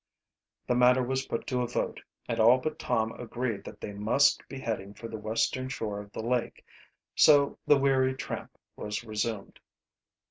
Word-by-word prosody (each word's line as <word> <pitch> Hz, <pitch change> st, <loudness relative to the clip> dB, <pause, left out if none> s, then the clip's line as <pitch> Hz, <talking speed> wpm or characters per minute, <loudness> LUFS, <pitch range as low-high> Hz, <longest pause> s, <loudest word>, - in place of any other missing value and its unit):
The -, -, +1 dB
matter 125 Hz, +1 st, +5 dB
was 130 Hz, +2 st, -2 dB
put 115 Hz, -, -3 dB
to 125 Hz, -1 st, -1 dB
a 120 Hz, -, -1 dB
vote -, -, -3 dB, 0.3 s
and -, -, -2 dB
all 115 Hz, +3 st, +7 dB
but 150 Hz, +4 st, -4 dB
Tom 110 Hz, -2 st, 0 dB
agreed 120 Hz, -3 st, -3 dB
that -, -, -10 dB
they 105 Hz, -, -6 dB
must 115 Hz, +8 st, +3 dB
be 135 Hz, -, -7 dB
heading 105 Hz, -4 st, -4 dB
for 115 Hz, -, -8 dB
the 110 Hz, -1 st, -7 dB
western 115 Hz, +4 st, -1 dB
shore 105 Hz, -5 st, -4 dB
of 105 Hz, 0 st, -10 dB
the 110 Hz, -, -6 dB
lake. 120 Hz, 0 st, -2 dB, 0.5 s
So 145 Hz, -2 st, +5 dB
the 145 Hz, -, +6 dB
weary 135 Hz, -1 st, +2 dB
tramp -, -, -6 dB, 0.2 s
was 105 Hz, +1 st, -4 dB
resumed. 110 Hz, -1 st, -4 dB
120 Hz, 175 wpm, -29 LUFS, 110-130 Hz, 0.5 s, all